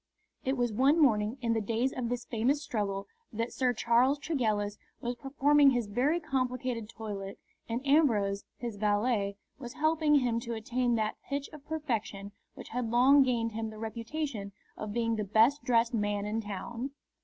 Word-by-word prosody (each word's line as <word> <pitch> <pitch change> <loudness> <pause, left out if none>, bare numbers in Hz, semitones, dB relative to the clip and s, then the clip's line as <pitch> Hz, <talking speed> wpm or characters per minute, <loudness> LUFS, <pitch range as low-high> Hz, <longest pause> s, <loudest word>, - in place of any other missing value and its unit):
It 265 +1 0
was 240 -2 0
one 275 +8 +4
morning 220 -4 +3
in 230 -2 +1
the 225 - 0
days 230 +5 0
of 240 -2 -3
this 245 -1 -3
famous 260 +6 0
struggle 200 -5 -2 0.3
that 230 +2 -3
Sir 255 -2 +2
Charles 245 +4 +3
Tregellis 215 -9 -1 0.2
was 240 0 -2
performing 280 +3 +4
his 245 -3 +1
very 255 +11 +1
complicated 255 -6 -2
toilet, 205 -4 -6 0.3
and 240 +4 -3
Ambrose, 220 -10 +3
his 235 -4 -5
valet, 205 0 +1 0.2
was 240 -3 -7
helping 310 -1 +2
him 245 -4 +2
to 235 0 -4
attain 240 +2 0
that 215 -1 -1
pitch 280 0 -2
of 300 -1 -12
perfection 225 -10 -3 0.2
which - - -10
had 240 0 -2
long 260 +5 +6
gained 235 -3 +1
him 220 0 -3
the 215 - -10
reputation 225 -1 -4 0.2
of 215 -1 -5
being 230 0 0
the 210 - -1
best 225 +8 +3
dressed 235 0 +2
man 205 -2 0
in 215 +2 -1
town. 230 +5 -5
235 Hz, 170 wpm, -30 LUFS, 215-265 Hz, 0.3 s, long